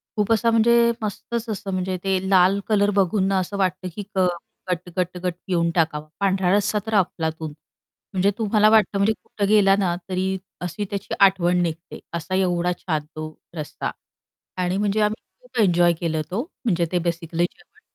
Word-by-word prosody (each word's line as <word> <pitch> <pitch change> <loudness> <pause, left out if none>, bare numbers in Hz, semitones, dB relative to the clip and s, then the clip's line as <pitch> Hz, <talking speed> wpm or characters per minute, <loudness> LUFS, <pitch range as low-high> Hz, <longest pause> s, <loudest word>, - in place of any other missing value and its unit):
खूप 210 -1 0
असा 230 +1 +2
म्हणजे 235 +1 +5
मस्तच 225 +2 -4
असं 205 -2 -4
म्हणजे 185 0 -1
ते 195 -1 +2
लाल 190 +1 +5
कलर 205 -1 +3
बघून 190 +1 +2
ना, 195 -1 +2
असं 195 +2 -3
वाटतं 185 -1 0
की 205 - -4
क 185 -1 +4 0.4
गट, 180 0 -3
गट, 180 0 -1
गट 180 -1 0
पिऊन 170 -3 +1
टाकावा. 155 -3 0
पांढरा 190 -2 +2
रस्सा 210 +1 +1
तर 220 - -3
अफलातून. 160 -5 -1 0.6
म्हणजे 195 +1 +2
तुम्हाला 215 -1 +3
वाटतं 215 -2 +4
म्हणजे 200 +3 +3
कुठं 200 -1 -2
गेला 200 -2 +5
ना, 175 -3 +1
तरी 190 +1 -1 0.2
अशी 180 +4 -3
त्याची 200 -1 -4
आठवण 180 -2 +4
निघते, 170 +1 -4
असा 170 +3 -3
एवढा 180 -2 +1
छान 155 -4 -2
तो 155 0 -6 0.2
रस्सा 155 -2 -4 0.7
आणि 180 +1 0
म्हणजे 205 +1 +1
आम्ही 210 +1 0 0.2
खूप - - -9
एन्जॉय 175 -3 +4
केलं 160 -2 -1
तो 195 +5 -1 0.2
म्हणजे 175 -7 +1
ते 180 - +3
बेसिकली 170 0 -1
जेवण - - -25
190 Hz, 175 wpm, -23 LUFS, 175-205 Hz, 0.7 s, म्हणजे